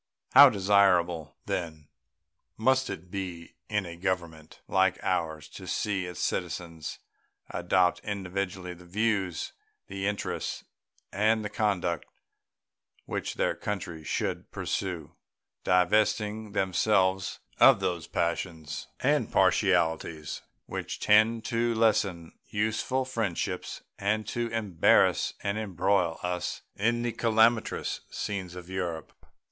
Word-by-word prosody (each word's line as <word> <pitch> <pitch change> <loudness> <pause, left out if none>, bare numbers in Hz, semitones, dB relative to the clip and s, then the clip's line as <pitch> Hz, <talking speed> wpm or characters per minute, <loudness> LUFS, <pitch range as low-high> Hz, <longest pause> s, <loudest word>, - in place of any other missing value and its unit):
How 140 -1 +10
desirable, 95 -6 +2
then, 80 -4 -4 0.7
must 130 +3 +2
it 90 +2 -7
be 90 -4 -5 0.2
in 105 -2 0
a 85 -1 -7
Government 85 -4 -3
like 95 -1 +3
ours 80 -4 -1
to - - -10
see 95 -4 -1
its 90 -2 -7
citizens 85 -2 -3 0.5
adopt 90 +1 +2
individually 95 -2 -4
the 90 +1 -14
views, 95 -2 -1 0.3
the 95 0 -3
interests, 105 0 -3 0.5
and 110 +2 +2
the 105 - -4
conduct 100 -5 0 1.0
which - - -3
their - - +1
country 85 -6 -5
should - - -2
pursue, - - -3 0.5
divesting 105 +3 +2
themselves 95 0 +1 0.2
of - - +8
those 85 -4 -2
passions 80 -3 -2
and 145 -3 +2
partialities 85 -5 +2 0.2
which - - -5
tend 110 +2 +4
to 115 -1 0
lessen 100 -7 +1 0.2
useful 110 +5 0
friendships 115 -9 -3 0.2
and 105 +1 0
to 120 0 -1
embarrass 105 -7 +3
and 100 +2 -1
embroil 95 -4 +1
us 90 0 -3
in 120 +4 +1
the 120 - 0
calamitous 115 0 +2
scenes 95 -4 -4
of 90 -1 -9
Europe. 90 -4 -4
95 Hz, 110 wpm, -28 LUFS, 85-110 Hz, 1.0 s, How